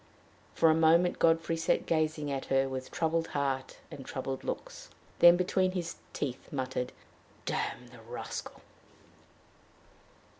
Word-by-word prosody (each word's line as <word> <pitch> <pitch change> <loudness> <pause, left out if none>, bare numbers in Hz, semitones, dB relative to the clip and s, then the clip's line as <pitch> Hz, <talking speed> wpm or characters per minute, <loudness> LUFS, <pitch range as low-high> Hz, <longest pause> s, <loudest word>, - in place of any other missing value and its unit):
For 160 - +5
a - - +5
moment 165 +2 +4
Godfrey 165 0 +3
sat 165 - +1
gazing 155 -2 0
at 135 -1 -3
her, 135 0 +2
with 130 -1 -5
troubled 165 0 0
heart 135 -2 -2
and 135 - -8
troubled 130 0 -4
looks, - - -5 0.3
then 175 0 +9
between 185 +1 +1
his 175 -2 -3
teeth 130 -3 -4
muttered, 130 -2 -2 0.5
"Damn 125 - -2
the 125 -2 -14
rascal!" 120 +2 -7
150 Hz, 125 wpm, -31 LUFS, 130-165 Hz, 0.5 s, then